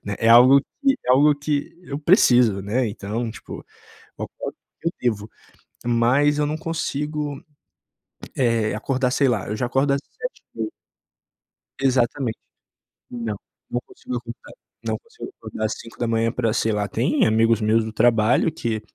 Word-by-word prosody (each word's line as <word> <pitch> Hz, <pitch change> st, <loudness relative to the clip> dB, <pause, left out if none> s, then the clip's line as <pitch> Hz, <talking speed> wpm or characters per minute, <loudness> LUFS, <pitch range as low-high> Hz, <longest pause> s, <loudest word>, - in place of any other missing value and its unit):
Né. 100 Hz, 0 st, -3 dB
É 115 Hz, -, +2 dB
algo 125 Hz, +4 st, +8 dB, 0.2 s
que 275 Hz, -1 st, +5 dB
é -, -, +2 dB
algo 145 Hz, +3 st, +6 dB
que 145 Hz, +2 st, -3 dB
eu 140 Hz, -3 st, -5 dB
preciso, 125 Hz, -, +4 dB
né. 115 Hz, +4 st, 0 dB
Então, 110 Hz, +3 st, -4 dB
tipo, -, -, -9 dB, 0.5 s
eu -, -, -2 dB
acordo -, -, -7 dB, 0.3 s
porque 165 Hz, -, 0 dB
eu -, -, -7 dB
devo, 110 Hz, -3 st, -1 dB, 0.6 s
mas 125 Hz, +5 st, +3 dB
eu 150 Hz, -, +2 dB
não 155 Hz, +1 st, -2 dB
consigo, 150 Hz, -2 st, -3 dB, 0.9 s
eh, 115 Hz, -4 st, +1 dB
acordar, 125 Hz, +3 st, 0 dB
sei 135 Hz, +1 st, +2 dB
lá, 110 Hz, -6 st, -1 dB
eu 105 Hz, -, -2 dB
já 125 Hz, -, -1 dB
acordo 135 Hz, +3 st, +1 dB
às 140 Hz, -, +1 dB
7:30. -, -, -7 dB, 1.1 s
Exatamente. 125 Hz, -2 st, +1 dB, 0.7 s
Não, 115 Hz, -3 st, -4 dB, 0.3 s
não 120 Hz, -, -1 dB
consigo 125 Hz, -, -7 dB
acordar. 120 Hz, 0 st, -10 dB, 0.3 s
Não -, -, -1 dB
consigo 465 Hz, -4 st, -11 dB
acordar 110 Hz, -, -5 dB
às 110 Hz, -, -1 dB
5h 115 Hz, 0 st, -1 dB
pra, 115 Hz, -3 st, 0 dB
sei 110 Hz, -1 st, +1 dB
lá 105 Hz, -1 st, -1 dB
Tem -, -, +1 dB
amigos 110 Hz, 0 st, +3 dB
meus 110 Hz, +1 st, +2 dB
do 110 Hz, -, -5 dB
trabalho 115 Hz, +6 st, +3 dB
que 110 Hz, -6 st, -3 dB
120 Hz, 155 wpm, -23 LUFS, 110-140 Hz, 1.1 s, algo